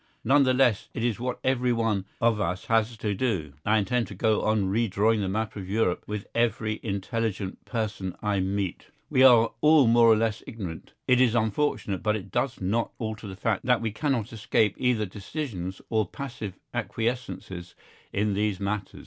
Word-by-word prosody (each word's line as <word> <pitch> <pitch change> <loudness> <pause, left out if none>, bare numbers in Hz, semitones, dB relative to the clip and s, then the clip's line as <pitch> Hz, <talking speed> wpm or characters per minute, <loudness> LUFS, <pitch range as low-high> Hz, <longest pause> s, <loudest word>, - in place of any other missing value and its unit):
None 140 +5 +5
the 130 - +3
less 125 -6 +2
it 115 - -2
is 115 -3 0
what 125 0 -2
everyone 115 -6 +1
of 115 -2 +2
us 90 0 -2
has 115 0 +1
to 105 -1 -1
do. 95 - -1
I 105 +1 +3
intend 120 +3 0
to 100 - -9
go 110 +3 +2
on 110 -1 +2
redrawing 110 0 +2
the 100 -2 -1
map 110 +3 -2
of 95 -3 -7
Europe 100 -3 0
with 105 -1 -4
every 115 -2 0
intelligent 100 -1 -3
person 105 -6 -3
I 105 -2 0
meet. 95 0 -2 0.2
We 130 - +3
are 120 -3 +7
all 150 -2 +6
more 115 0 +6
or 110 - +7
less 110 -1 0
ignorant; 90 -8 -7
it 125 0 +5
is 120 -2 +4
unfortunate 110 -3 0
but 105 0 +1
it 100 -2 -7
does 125 +1 -1
not 105 +5 -1
alter 110 -1 -5
the 95 - -7
fact 95 - -1
that 125 -2 +4
we 115 -2 -2
cannot 115 -2 -1
escape 110 -2 +1
either 125 -4 +2
decisions 100 - -5
or 110 -3 +2
passive 115 -5 -6 0.2
acquiescences 110 -7 -3 0.4
in 105 0 0
these 105 -1 0
matters. 100 0 -3
110 Hz, 180 wpm, -27 LUFS, 100-120 Hz, 0.4 s, are